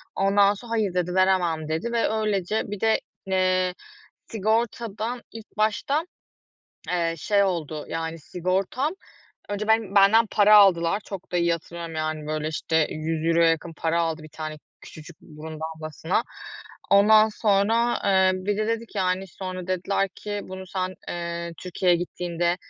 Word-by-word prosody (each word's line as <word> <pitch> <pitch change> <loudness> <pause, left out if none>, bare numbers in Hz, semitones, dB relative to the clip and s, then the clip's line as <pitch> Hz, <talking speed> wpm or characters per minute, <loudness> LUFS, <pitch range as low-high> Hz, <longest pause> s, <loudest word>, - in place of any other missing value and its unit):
Ondan 200 +1 +4
sonra, 230 +3 -11
"Hayır." 215 -5 0
dedi. 180 0 -1
"Veremem." 175 -5 +2
dedi 160 +9 -2
ve 230 - +2
öylece 215 -2 0
bir 205 - -4
de, 220 0 +3 0.3
eee, 185 -1 +2 0.5
sigortadan 225 +1 -1
ilk 225 -2 -12
başta, 275 +9 +1 0.8
eee, 170 -2 0
şey 200 +5 +2
oldu, 155 -5 -2
yani, 165 0 -4
sigortam 190 - -1 0.6
önce 210 +1 -3
ben 220 -3 +2
benden 210 +3 +6
para 210 0 +6
aldılar. 190 -1 +5
Çok 190 -2 -8
da - - +1
iyi 170 0 +2
hatırlıyorum. 170 0 -6
Yani, 155 -1 -3
böyle, 155 0 -2
işte, 160 0 +1
€100 165 +1 +2
yakın 165 +1 -2
para 165 +2 0
aldı 165 -1 -2
1 155 - -11
tane 155 0 -6 0.2
küçücük 155 +1 -12
burun 155 0 -10
damlasına. 160 +1 -2 0.7
Ondan 215 +2 +6
sonra, 220 +3 +2
eee, 190 -1 +4
bir 195 +2 -2
de 215 - 0
dedi 230 0 -1
ki, 205 - -7
yani, 185 +1 0
sonra 185 -1 -6
dediler 190 +2 0
ki, 205 -1 -5
"Bunu 190 0 -8
sen, 185 0 -3
eee, 170 0 -4
Türkiye'ye 180 -1 +1
gittiğinde 175 0 -2
185 Hz, 150 wpm, -25 LUFS, 165-205 Hz, 0.8 s, benden